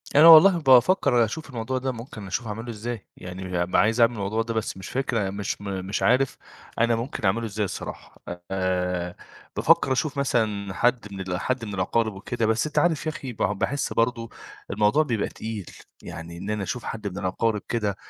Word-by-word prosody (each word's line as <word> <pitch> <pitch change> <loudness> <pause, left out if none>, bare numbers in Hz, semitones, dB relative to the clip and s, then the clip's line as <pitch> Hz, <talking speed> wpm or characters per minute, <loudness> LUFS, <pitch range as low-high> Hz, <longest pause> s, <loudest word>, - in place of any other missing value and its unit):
أنا 155 +3 +9
والله 170 +3 +9
بافكر 130 -3 +5
أشوف 155 +8 -6
الموضوع 125 +1 -3
ده 130 +1 -1
ممكن 115 -4 -9
أشوف 105 +5 -3
أعمله 115 +3 -5
إزاي، 115 0 -5
يعني 90 -1 -3
ب 90 - -5
عايز 110 +3 +3
أعمل 115 +1 +5
الموضوع 105 +1 -1
ده 115 0 -3
بس 110 -3 -3
مش 95 - -8
فاكر 115 -7 -1
مش 100 0 -4
م 100 - -7 0.2
مش 100 +2 -2
عارف 130 +2 +3 0.4
أنا 115 0 +3
ممكن 115 -1 -4
أعمله 115 +5 +1
إزاي 105 -1 -2
الصراحة، - - -8 0.3
آآ 90 -2 -1 0.4
بافكر - - +3
أشوف 140 +3 0
مثلًا 105 -7 0
حد 120 +1 +1
من 95 - -7
ال 90 -2 -3
حد 130 0 -2
من 105 - -6
الأقارب 110 +4 0
وكده 115 +4 -3
بس 110 +6 +1
أنت 150 - 0
عارف 165 -3 +1
يا 155 - 0
أخي 135 -7 -7
ب - - -20
باحس 105 +8 -1
برضو 115 0 0 0.4
الموضوع 105 +9 +3
بيبقى 115 -8 -1
تقيل 110 -4 -6 0.4
يعني 85 +1 -8
إن 100 - -6
أنا 105 -1 -1
أشوف 120 +5 -4
حد 110 -2 -5
من 95 -1 -6
الأقارب 105 +3 -1
كده 105 -4 -1
110 Hz, 190 wpm, -25 LUFS, 100-125 Hz, 0.4 s, أنا